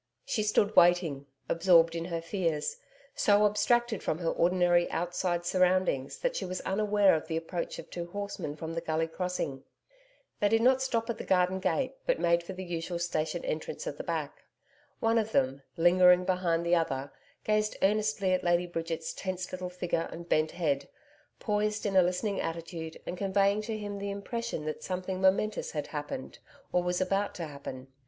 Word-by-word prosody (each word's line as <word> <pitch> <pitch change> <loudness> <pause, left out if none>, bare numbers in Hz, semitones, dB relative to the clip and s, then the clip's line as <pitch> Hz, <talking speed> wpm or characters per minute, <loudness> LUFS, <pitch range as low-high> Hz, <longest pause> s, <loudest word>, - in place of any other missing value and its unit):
She 215 - -1
stood 210 0 +2
waiting, 170 -6 +4 0.2
absorbed 170 -1 +5
in 165 0 -3
her 170 -2 -3
fears, 165 -4 -1 0.4
so 205 0 +4
abstracted 220 +2 +2
from 155 - -1
her 165 -1 -1
ordinary 175 0 +3
outside 175 +1 -1
surroundings 180 -7 +2
that - - 0
she - - -2
was 185 0 -3
unaware 205 0 +3
of 160 0 -1
the 160 -1 -1
approach 170 +1 -4
of - - -8
two 170 -1 -5
horsemen 200 -5 -5
from 160 +1 -6
the 165 - -2
Gully 160 0 0
Crossing. 165 -6 -3 0.8
They 205 - +3
did 225 +1 +3
not 260 +1 +5
stop 235 -4 0
at 230 - -7
the - - -4
garden 185 0 +2
gate, 260 +7 0
but - - +2
made 170 0 +3
for 170 +3 -7
the 185 0 -6
usual 175 0 -3
station 170 - -2
entrance - - -4
at - - -4
the - - -3
back. - - -3 0.6
One 225 0 +3
of 220 0 -3
them, 135 +1 +1 0.2
lingering 180 +1 +6
behind 175 -3 +1
the 170 - +2
other, 140 -5 0 0.3
gazed 215 0 +1
earnestly 205 -1 +2
at 185 - 0
Lady 175 0 +2
Bridget's 165 -1 -4
tense 185 -1 -4
little 185 0 -4
figure 180 -2 -2
and 170 +1 -8
bent 155 -1 +2
head, 150 -6 -1 0.5
poised 210 0 -1
in 200 -2 0
a 190 - +8
listening 185 +3 0
attitude 165 -1 -5
and 175 - -5
conveying 200 +1 +2
to 220 0 -4
him 205 -1 -5
the 200 0 -3
impression 200 -3 -4
that 155 - -4
something 185 0 -3
momentous 195 +3 +2
had 150 -2 -2
happened 145 -3 -6 0.3
or 180 - +2
was 180 0 -1
about 195 +2 0
to 170 - -4
happen. 140 -3 -8
180 Hz, 180 wpm, -30 LUFS, 165-205 Hz, 0.8 s, a